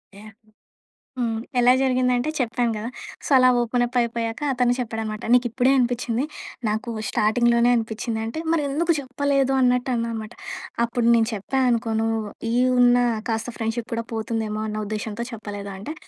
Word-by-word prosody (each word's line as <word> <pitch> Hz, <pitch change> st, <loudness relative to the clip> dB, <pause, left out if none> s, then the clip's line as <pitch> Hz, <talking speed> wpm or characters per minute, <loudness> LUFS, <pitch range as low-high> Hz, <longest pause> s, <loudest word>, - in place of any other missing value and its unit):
Yeah! 215 Hz, +2 st, -12 dB
హ్మ్. 215 Hz, +1 st, -32 dB, 0.8 s
హ్మ్. 225 Hz, 0 st, -3 dB, 0.2 s
ఎలా 245 Hz, +1 st, +6 dB
జరిగిందంటే 255 Hz, +1 st, +1 dB
చెప్పాను 240 Hz, -2 st, 0 dB
గదా! 215 Hz, +2 st, -4 dB, 0.4 s
సో -, -, -5 dB
అలా 255 Hz, 0 st, +6 dB
ఓపెన్ 240 Hz, +1 st, +1 dB
అప్ 245 Hz, -, -8 dB
అయిపోయాక 230 Hz, 0 st, -2 dB
అతనే 245 Hz, -1 st, +2 dB
చెప్పాడనమాట. 220 Hz, -3 st, -4 dB
నీకు 250 Hz, 0 st, +4 dB
ఇప్పుడే 250 Hz, +3 st, +2 dB
అనిపిచ్చింది. 245 Hz, 0 st, 0 dB, 0.4 s
నాకు 220 Hz, +3 st, -2 dB, 0.2 s
స్టార్టింగ్‌లోనే 235 Hz, +2 st, +3 dB
అనిపిచ్చింది 225 Hz, 0 st, -3 dB
అంటే 225 Hz, +7 st, -5 dB
మరి 325 Hz, -3 st, +2 dB
ఎందుకు 330 Hz, +5 st, +1 dB
చెప్పలేదు 275 Hz, 0 st, 0 dB
అన్నట్టు 250 Hz, 0 st, +2 dB
అన్నానమాట. 230 Hz, -1 st, -3 dB, 0.5 s
అప్పుడు 235 Hz, 0 st, -1 dB
నేను 225 Hz, -1 st, +3 dB
చెప్పా 215 Hz, +6 st, -2 dB
అనుకో 230 Hz, -1 st, 0 dB
నువ్వు 225 Hz, 0 st, 0 dB, 0.3 s
ఈ -, -, 0 dB, 0.2 s
ఉన్న 245 Hz, 0 st, +6 dB, 0.3 s
కాస్త 225 Hz, +1 st, -2 dB
ఫ్రెండ్‌షిప్ 225 Hz, +1 st, -3 dB
కూడా 230 Hz, 0 st, -2 dB
పోతుందేమో 220 Hz, -1 st, -2 dB
అన్న 215 Hz, 0 st, -3 dB
ఉద్దేశ్యంతో 215 Hz, +2 st, -4 dB
చెప్పలేదు 205 Hz, -2 st, -6 dB
అంటే. 210 Hz, +11 st, -6 dB
235 Hz, 155 wpm, -23 LUFS, 220-250 Hz, 0.8 s, ఎలా